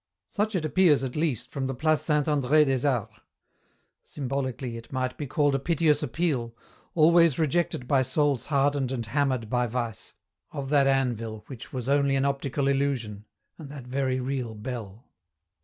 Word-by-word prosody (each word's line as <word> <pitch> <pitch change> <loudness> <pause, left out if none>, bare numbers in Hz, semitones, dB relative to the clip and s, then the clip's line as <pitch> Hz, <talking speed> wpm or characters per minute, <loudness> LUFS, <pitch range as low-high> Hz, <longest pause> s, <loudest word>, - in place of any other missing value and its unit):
Such 210 +1 -1
it 165 -4 0
appears, 155 -4 +4
at 130 -2 -4
least, 150 -7 -1
from 135 -1 -2
the 135 - -3
Place 155 +2 +1
Saint 150 -2 +1
Andr^ 150 +1 +3
des 135 0 +1
Arts. 115 -5 -1 0.9
Symbolically 130 -3 -4
it 115 0 -10
might 130 -1 -2
be 145 - -5
called 145 0 +2
a 135 - +1
piteous 155 -1 +2
appeal, 130 -5 -1 0.4
always 170 -2 +5
rejected 155 -4 0
by 135 -1 +3
souls 130 -1 0
hardened 140 -2 +1
and 120 -3 -3
hammered 130 0 0
by 125 +2 0
vice, 115 -3 -5 0.4
of 135 -2 -5
that 140 -2 +4
anvil 115 -5 -1
which 130 -5 -10
was 125 -2 -5
only 140 0 +3
an 135 0 +1
optical 140 0 -1
illusion, 130 -7 -1 0.3
and 150 -4 -9
that 140 -3 -9
very 130 0 -1
real 125 -3 -3
bell. 110 0 -7
135 Hz, 165 wpm, -27 LUFS, 125-145 Hz, 0.9 s, always